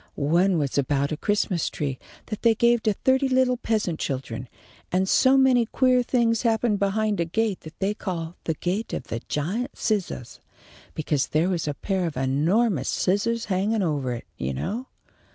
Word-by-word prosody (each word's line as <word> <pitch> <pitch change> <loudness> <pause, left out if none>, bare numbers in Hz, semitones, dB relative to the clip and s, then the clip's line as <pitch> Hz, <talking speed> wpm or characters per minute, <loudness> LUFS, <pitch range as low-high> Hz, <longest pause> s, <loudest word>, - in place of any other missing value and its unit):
One 170 +6 +2
was 140 -2 0
about 140 +1 0
a - - 0
Christmas 190 -1 0
tree 135 -3 -3 0.3
that 215 - -6
they 230 -1 +4
gave 235 +1 +3
to 215 - +1
thirty 265 +5 +2
little 255 -1 +3
peasant 215 -9 -1
children, 130 -3 -4 0.4
and 185 +1 +1
so 260 +7 +5
many 255 -3 +4
queer 255 +1 +3
things 235 -2 +1
happened 225 -3 +1
behind 205 +1 0
a 170 - +1
gate 210 +3 -1
that 155 +1 -12
they 200 +2 0
called 170 -6 -4
the 160 - -1
'Gate 190 +8 -2
of - - -3
the 115 - -2
Giant 190 - -2
Scissahs,' 190 - -2 0.6
because 150 -3 0
there 160 +4 +1
was 170 -4 -1
a 145 - -2
pair 190 0 -1
of 155 - -6
enormous 150 - +1
scissahs 230 +5 0
hanging 200 +2 0
ovah 140 -7 -1
it, - - -11
you 65 +1 -2
know. 225 - -3
190 Hz, 175 wpm, -25 LUFS, 155-230 Hz, 0.6 s, so